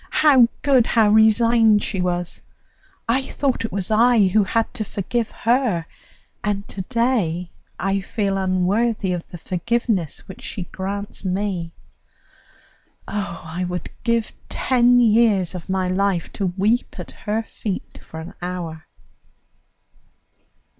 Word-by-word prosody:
how 270 Hz, -6 st, +5 dB, 0.2 s
good, 265 Hz, -5 st, +4 dB
how 220 Hz, -3 st, +4 dB
resigned 220 Hz, 0 st, +5 dB
she 190 Hz, -, -2 dB
was! 175 Hz, -1 st, -2 dB, 0.7 s
I 245 Hz, +4 st, +2 dB
thought 265 Hz, -1 st, -1 dB
it -, -, -5 dB
was 195 Hz, +1 st, -3 dB
I 225 Hz, -2 st, +5 dB
who 210 Hz, +3 st, +3 dB
had 225 Hz, +3 st, 0 dB
to 235 Hz, -4 st, -3 dB
forgive 215 Hz, +3 st, -2 dB
her, 230 Hz, -8 st, +1 dB, 0.6 s
and 200 Hz, -1 st, -2 dB
to 195 Hz, -, -5 dB
day 225 Hz, -9 st, 0 dB, 0.3 s
I 195 Hz, +1 st, 0 dB
feel 195 Hz, 0 st, -1 dB
unworthy 190 Hz, +2 st, +1 dB
of 175 Hz, -1 st, -3 dB
the 175 Hz, -, -8 dB
forgiveness 185 Hz, -, -2 dB
which 190 Hz, -, -10 dB
she 190 Hz, -, -5 dB
grants 200 Hz, +4 st, -5 dB
me. 185 Hz, -3 st, -2 dB, 1.3 s
Oh, 200 Hz, -4 st, -4 dB
I 165 Hz, +3 st, -4 dB
would 180 Hz, -2 st, -5 dB
give 230 Hz, -2 st, 0 dB, 0.2 s
ten 245 Hz, -1 st, +3 dB
years 220 Hz, -6 st, +3 dB
of 180 Hz, -2 st, -8 dB
my 190 Hz, -1 st, 0 dB
life 185 Hz, -2 st, 0 dB
to 195 Hz, -, -1 dB
weep 200 Hz, +7 st, 0 dB
at -, -, -7 dB
her 220 Hz, +1 st, -3 dB
feet 205 Hz, -3 st, -6 dB
for 160 Hz, -, -9 dB
an 160 Hz, -, -8 dB
hour!" 175 Hz, -3 st, -5 dB
200 Hz, 135 wpm, -22 LUFS, 180-230 Hz, 1.3 s, how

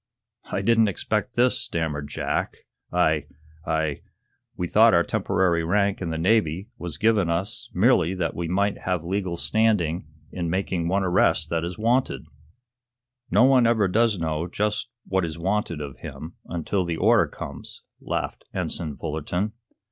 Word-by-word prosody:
"I -, -, -1 dB
didn't 115 Hz, -1 st, +4 dB
expect 105 Hz, +5 st, -2 dB
this," 125 Hz, +1 st, +3 dB
stammered 75 Hz, -3 st, -3 dB
Jack. 75 Hz, -, -2 dB, 0.3 s
"I 80 Hz, -4 st, +2 dB, 0.4 s
I 80 Hz, -2 st, 0 dB, 0.6 s
we 90 Hz, -, -1 dB
thought -, -, +6 dB
our -, -, +5 dB
temporary 85 Hz, -3 st, +1 dB
rank 100 Hz, +4 st, +1 dB
in 85 Hz, -, -2 dB
the 80 Hz, -, -2 dB
Navy 95 Hz, +1 st, +1 dB
was 85 Hz, -5 st, -5 dB
given 105 Hz, -3 st, +3 dB
us 100 Hz, +7 st, -3 dB
merely 95 Hz, -3 st, +3 dB
that 85 Hz, -5 st, -1 dB
we 85 Hz, -1 st, -3 dB
might 100 Hz, +4 st, 0 dB
have 90 Hz, -3 st, -2 dB
legal 90 Hz, -1 st, -2 dB
standing 95 Hz, -7 st, +1 dB, 0.2 s
in 85 Hz, -2 st, -3 dB
making 90 Hz, -1 st, -1 dB
one 95 Hz, +3 st, +1 dB
arrest 90 Hz, -1 st, +2 dB
that 85 Hz, -1 st, 0 dB
is 85 Hz, +1 st, -4 dB
wanted." 120 Hz, -3 st, +1 dB, 1.0 s
"No 105 Hz, +7 st, +5 dB
one 130 Hz, -2 st, +5 dB
ever 110 Hz, -4 st, +3 dB
does 110 Hz, +2 st, +2 dB
know 80 Hz, 0 st, -2 dB
just 105 Hz, +5 st, -1 dB, 0.2 s
what 95 Hz, -1 st, 0 dB
is 80 Hz, -1 st, -4 dB
wanted 90 Hz, -2 st, -1 dB
of 70 Hz, -2 st, -7 dB
him, 80 Hz, +2 st, -8 dB
until 90 Hz, +3 st, -1 dB
the 85 Hz, -2 st, -3 dB
order -, -, +4 dB
comes," -, -, -8 dB, 0.2 s
laughed -, -, -4 dB
Ensign 75 Hz, -4 st, -3 dB
Fullerton. 90 Hz, +7 st, -2 dB
90 Hz, 155 wpm, -25 LUFS, 80-105 Hz, 1.0 s, thought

